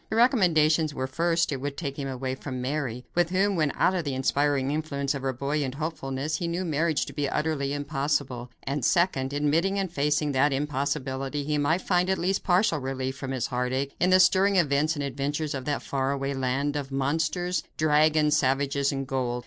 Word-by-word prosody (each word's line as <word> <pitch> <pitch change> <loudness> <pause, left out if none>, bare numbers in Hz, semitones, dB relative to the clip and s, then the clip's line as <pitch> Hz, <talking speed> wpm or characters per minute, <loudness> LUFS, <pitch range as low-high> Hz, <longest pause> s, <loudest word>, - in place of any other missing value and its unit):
The - - -2
recommendations 165 - +3
were, 130 - -2
first, 165 +5 0
it 135 -2 -3
would 140 0 -4
take 140 -5 -4
him 140 - -3
away 130 0 -3
from 130 -1 -6
Mary, 125 -2 -3
with 175 -1 +2
whom 195 +2 +1
when 155 -4 +1
out 185 - +3
of 180 -2 -1
the 140 -3 -3
inspiring 140 +1 +1
influence 145 -2 -2
of 140 - -4
her 135 0 -1
buoyant 140 +1 -2
hopefulness 150 -1 -3
he 175 - -3
knew 175 +2 -2
marriage 160 -1 0
to 140 - -9
be 145 0 -1
utterly 150 -3 -1
impossible; 140 -3 -2
and 140 0 -3
second, 140 -4 +2
admitting 155 +7 +1
and 190 -3 -1
facing 150 0 +1
that 140 +1 +2
impossibility, 135 0 -2
he 150 +1 -1
might 160 +5 +1
find 180 0 +1
at 190 - +2
least 190 +3 0
partial 180 -3 +2
relief 130 0 -3
from 135 0 -6
his 130 -3 -1
heartache 130 +2 -2
in 180 - +3
the 185 0 +6
stirring 190 +2 +4
events 155 -2 +2
and 145 - -3
adventures 145 +3 -2
of 135 -2 -5
that 145 -1 -2
faraway 135 0 -1
land 135 +2 -1
of 140 -2 -4
monsters, 160 +6 0 0.2
dragons, 155 0 +3
savages 140 0 +1
and 135 -1 -3
gold. 125 -2 -1
145 Hz, 195 wpm, -26 LUFS, 135-160 Hz, 0.2 s, the